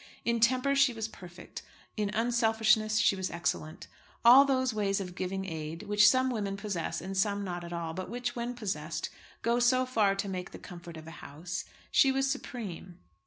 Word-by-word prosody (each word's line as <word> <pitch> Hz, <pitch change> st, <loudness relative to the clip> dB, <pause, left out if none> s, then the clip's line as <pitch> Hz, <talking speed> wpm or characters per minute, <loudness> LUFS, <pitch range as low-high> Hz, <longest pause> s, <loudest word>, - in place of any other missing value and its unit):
In 235 Hz, 0 st, +1 dB
temper 255 Hz, +4 st, +3 dB
she 275 Hz, -2 st, +4 dB
was 225 Hz, -1 st, -3 dB
perfect; 180 Hz, -5 st, -11 dB, 0.3 s
in 210 Hz, -2 st, -1 dB
unselfishness 220 Hz, -2 st, +2 dB
she 210 Hz, -, +4 dB
was 190 Hz, -1 st, -3 dB
excellent. 165 Hz, -2 st, -3 dB
In -, -, -25 dB, 0.4 s
all 255 Hz, +4 st, +9 dB
those 260 Hz, -3 st, +1 dB
ways 200 Hz, -2 st, 0 dB
of 180 Hz, -2 st, -5 dB
giving 190 Hz, +1 st, -3 dB
aid, 160 Hz, 0 st, -5 dB
which 210 Hz, 0 st, +5 dB
some 260 Hz, 0 st, +2 dB
women 200 Hz, -4 st, -2 dB
possess 200 Hz, -7 st, -3 dB
and 190 Hz, +3 st, -5 dB
some 200 Hz, +1 st, +1 dB
not 175 Hz, -2 st, -4 dB
at 170 Hz, -, -8 dB
all, 170 Hz, -1 st, -4 dB
but 185 Hz, +2 st, -5 dB
which, 245 Hz, 0 st, -3 dB
when 240 Hz, +1 st, -3 dB
possessed, 165 Hz, -8 st, -4 dB, 0.3 s
go 235 Hz, +1 st, +2 dB
so 255 Hz, +1 st, +3 dB
far 215 Hz, -6 st, +2 dB
to 200 Hz, +1 st, -3 dB
make 185 Hz, -2 st, -4 dB
the -, -, -7 dB
comfort 170 Hz, -2 st, -10 dB
of 160 Hz, -, -10 dB
a 165 Hz, -, -9 dB
house, 175 Hz, +6 st, -6 dB, 0.3 s
she 270 Hz, -, +5 dB
was 270 Hz, 0 st, +1 dB
supreme. 210 Hz, -10 st, -6 dB
205 Hz, 195 wpm, -30 LUFS, 180-240 Hz, 0.4 s, all